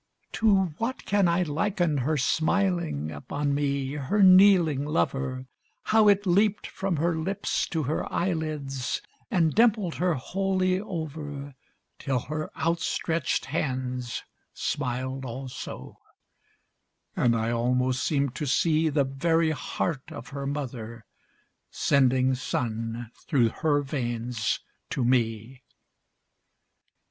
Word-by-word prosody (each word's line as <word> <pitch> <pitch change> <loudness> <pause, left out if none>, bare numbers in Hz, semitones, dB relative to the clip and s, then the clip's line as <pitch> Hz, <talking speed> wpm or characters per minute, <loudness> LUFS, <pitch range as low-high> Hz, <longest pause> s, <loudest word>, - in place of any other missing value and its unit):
To 195 -6 +2
what 240 +3 -3
can 200 -2 +3
I 170 +2 +2
liken 170 0 0
her 150 +5 0
smiling 160 - 0
Upon 140 - -2
me, 140 -2 0
her 150 +9 +1
kneeling 185 -6 +6
lover, 135 -3 -1 0.4
How 220 -1 +4
it 205 0 +4
leaped 200 +3 +2
from 190 -2 -2
her 165 +2 +1
lips 185 +5 -1
to 160 -2 -2
her 145 +4 -2
eyelids, 155 -7 -2 0.3
And 165 -4 +2
dimpled 215 -6 +3
her 180 -1 +1
wholly 185 +5 0
over, 150 -7 -6 0.5
Till 135 -3 -1
her 155 +5 -4
outstretched 165 -2 0
hands 125 -3 -3 0.3
smiled 130 +2 -2
also, 130 +1 -7 1.2
And 120 -2 +3
I 115 +1 0
almost 125 +2 +1
seemed 140 -4 0
to 150 - -2
see 155 +4 +2
The 145 -1 +2
very 160 +4 +1
heart 150 -1 -3
of 115 - -8
her 140 0 -5
mother 120 -5 -5 0.6
Sending 130 -1 +3
sun 115 -2 -3 0.2
through 125 -7 +3
her 145 +3 +1
veins 120 -4 -2 0.3
to 125 - -1
me! 120 0 0
145 Hz, 115 wpm, -27 LUFS, 130-170 Hz, 1.2 s, kneeling